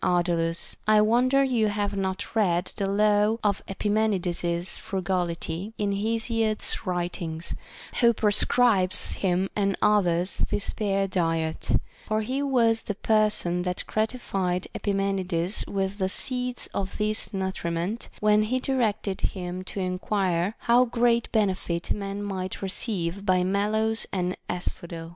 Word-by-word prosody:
27 180 - +3 0.2
Ardalus, 165 0 -1
I 215 0 +6
wonder 250 +6 +4
you 240 -5 +2
have 205 -1 -1
not 195 +2 -3
read 180 -5 +2
the 195 - -1
law 210 +2 +3
of 200 -2 +1
Epi 195 +2 -3
menides's 180 -5 0
frugality 180 0 -3
in 205 -1 0
Hesiod's 220 +1 -1
writings, 175 -2 -3 0.5
who 235 -2 +6
prescribes 210 -2 +2
him 185 0 0
and 195 -2 +1
others 185 -4 +2
this 205 - -1
spare 195 -2 0
diet; 165 -3 -1 0.3
for 215 0 +1
he 260 +6 -2
was 235 -5 +3
the 205 - -4
person 210 -5 +2
that 180 0 -2
gratified 195 -5 -1
Epimenides 195 -2 -1
with 195 +1 -2
the 190 -1 +1
seeds 250 +3 -1
of 195 0 -3
this 215 0 -1
nutriment, 190 +1 -3
when 210 0 +4
he 225 +4 0
directed 220 -7 0
him 180 -1 -3
to 195 - -6
enquire 185 0 0
how 240 +1 +5
great 235 -1 +1
benefit 185 -5 0
a - - +5
man 200 0 -4
might 190 -1 -4
receive 190 -2 -2
by 185 -2 +3
mallows 215 +4 +1
and 180 -1 -1
asphodel. 170 -2 -4
200 Hz, 135 wpm, -26 LUFS, 180-215 Hz, 0.5 s, I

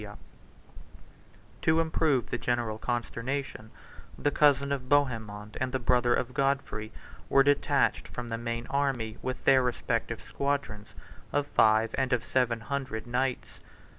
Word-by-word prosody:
] - - -25
To 160 +1 +3
improve 160 -5 +1
the 120 - -1
general 120 -3 -1
consternation, 120 0 -3 0.5
the 145 - 0
cousin 140 -2 +3
of 130 -2 -3
Bohemond 110 -7 0
and 130 0 0
the 130 - 0
brother 125 -1 +2
of 125 0 -2
Godfrey 135 -6 -1 0.4
were 135 - +6
detached 145 0 +2
from 120 -1 -7
the 115 - -2
main 115 0 -3
army 130 -6 -1
with 130 0 -5
their 135 -1 +6
respective 125 -2 -2
squadrons 140 -7 -3 0.4
of 145 - +1
five, 110 -4 +3
and 130 -1 +1
of 120 - +1
seven, 120 -3 0
hundred 130 -3 -4
knights. 125 +1 -2
125 Hz, 135 wpm, -29 LUFS, 115-140 Hz, 0.5 s, were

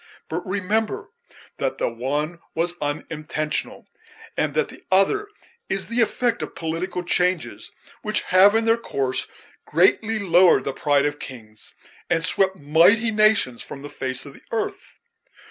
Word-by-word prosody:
But 170 +3 -3
remember 205 +3 -1 0.5
that - - -2
the - - 0
one 145 +8 -3 0.2
was 170 +1 +1
unintentional, 150 +1 -3 0.5
and - - -1
that - - +1
the - - -13
other 195 - +3 0.4
is 195 0 -1
the 235 +1 +1
effect 235 +1 +1
of - - -6
political 170 +2 -3
changes, 180 -1 0 0.3
which 215 -1 0
have, 195 +3 +5
in 225 0 +2
their 225 0 +4
course, 135 - -2 0.4
greatly 205 +7 +3
lowered 185 -3 +5
the 140 - -3
pride 145 0 +2
of 145 0 -2
kings, 110 -4 -11 0.3
and 165 -1 +1
swept 190 0 +1
mighty 175 +9 +4
nations 215 - +3
from 140 - -9
the 145 - -8
face 130 0 -3
of 140 - -10
the - - -16
earth. 225 -1 -4
175 Hz, 145 wpm, -23 LUFS, 145-205 Hz, 0.5 s, have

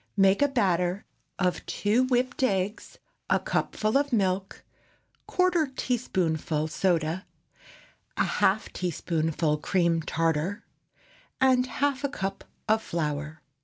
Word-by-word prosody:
Make 195 +3 +4
a 285 - +5
batter 185 -7 0 0.3
of 180 -2 0
two 220 +5 +2
whipped 255 0 0
eggs, 200 -3 -1 0.3
a - - +4
cupful 215 +5 0
of 285 0 -2
milk, 195 -3 0 0.6
quarter 350 -6 +2
teaspoonful 165 - -1
soda, 170 +1 0 0.9
a - - +3
half 205 +3 +1
teaspoonful 160 -3 -1
cream 170 0 +1
tartar, 165 +6 -1 0.7
and 255 -1 +4
half 280 +1 -1
a 280 - +1
cup 195 -8 -4 0.2
of 220 +1 +3
flour. 150 -3 -3
190 Hz, 110 wpm, -27 LUFS, 165-250 Hz, 0.9 s, a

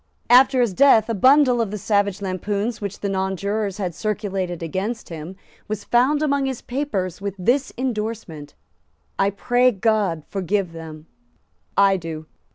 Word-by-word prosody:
After 255 +1 +6
his 235 -6 +1
death 230 -2 +5
a - - +1
bundle 255 +3 +4
of 225 - -1
the 210 - -4
savage 200 -1 0
lampoons 200 +4 -2
which 200 -1 -5
the 205 - -1
nonjurors 195 +1 -2
had 185 -4 -3
circulated 190 -3 -3
against 195 +8 -4
him 165 +2 -7 0.3
was 215 -1 -4
found 270 +5 +2
among 280 -2 +1
his 265 -3 -3
papers 205 - -3
with 200 -1 -4
this 255 +9 +1
indorsement: 215 - -4 0.6
"I 195 - +3
pray 245 +5 +2
God 205 -6 0
forgive 195 -1 -1
them; 160 -2 -10 0.7
I 195 -1 +5
do." 160 -3 -7
200 Hz, 150 wpm, -22 LUFS, 185-240 Hz, 0.7 s, After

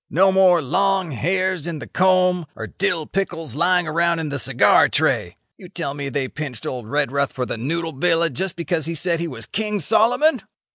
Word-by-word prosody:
No 190 +3 +3
more 185 -3 +4
long 190 +4 0
hairs 185 +4 -1
in 170 -2 -4
the - - -8
comb 180 -2 +2
or - - -6
dill 180 -5 -1
pickles 165 - -4
lying 180 +2 +2
around 170 +2 +1
in 160 -2 -3
the 145 0 -3
cigar - - +4
tray.' 85 - 0 0.2
You 180 - -12
tell 165 -6 -4
me 140 -1 -5
they 135 0 -2
pinched 135 -5 -7
old 125 -4 -5
Redruth 140 0 0
for 130 -1 -3
the - - -4
noodle 160 +7 -2
villa 165 +2 +2
just 185 +7 -3
because 170 -2 -2
he 165 - -3
said 170 +1 0
he 170 - -2
was 115 -7 -6
King 210 - -3
Solomon? 230 - +2
170 Hz, 195 wpm, -21 LUFS, 145-185 Hz, 0.2 s, more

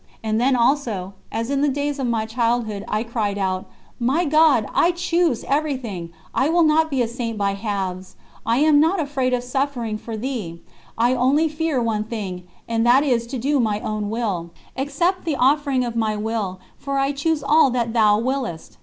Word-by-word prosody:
And 220 +1 0
then 260 +1 +3
also, 235 -7 0 0.2
as 230 +4 -2
in 280 0 +1
the 290 - +3
days 285 +1 -2
of 260 - -1
my 225 -2 0
childhood, 230 -2 -1
I 215 +1 -1
cried 220 -4 -2
out: 185 -1 -2 0.3
"My 270 +9 +1
God, 305 -6 +4
I 340 - +4
choose 345 -6 0
everything, 260 - -2 0.2
I 275 - +2
will 340 +1 +4
not 315 +1 +3
be 265 -4 +1
a - - -1
Saint 230 -1 -4
by 200 -1 +1
halves, 195 -3 -4 0.3
I 230 +1 +1
am 305 -1 +5
not 330 +5 +3
afraid 275 -4 -1
of 250 -1 0
suffering 245 -4 -2
for 225 0 -6
Thee, 215 -9 -4 0.4
I 240 +2 +3
only 265 +6 +3
fear 310 -2 -1
one 215 -2 -1
thing, 190 -6 -6 0.2
and 225 -1 0
that 250 +4 +5
is 240 -5 +1
to 260 +2 -4
do 275 +4 +1
my 215 -3 +1
own 215 -1 -3
will. 205 -7 -2 0.3
Accept 295 +8 0
the 320 -4 -1
offering 275 -1 +2
of 235 -1 -4
my 220 -2 0
will, 210 -3 -3 0.2
for 275 0 -3
I 275 +1 +1
choose 290 +2 -1
all 295 0 +5
that 235 -2 -1
Thou 215 -3 +4
willest." 245 -8 -3
245 Hz, 190 wpm, -22 LUFS, 215-285 Hz, 0.4 s, am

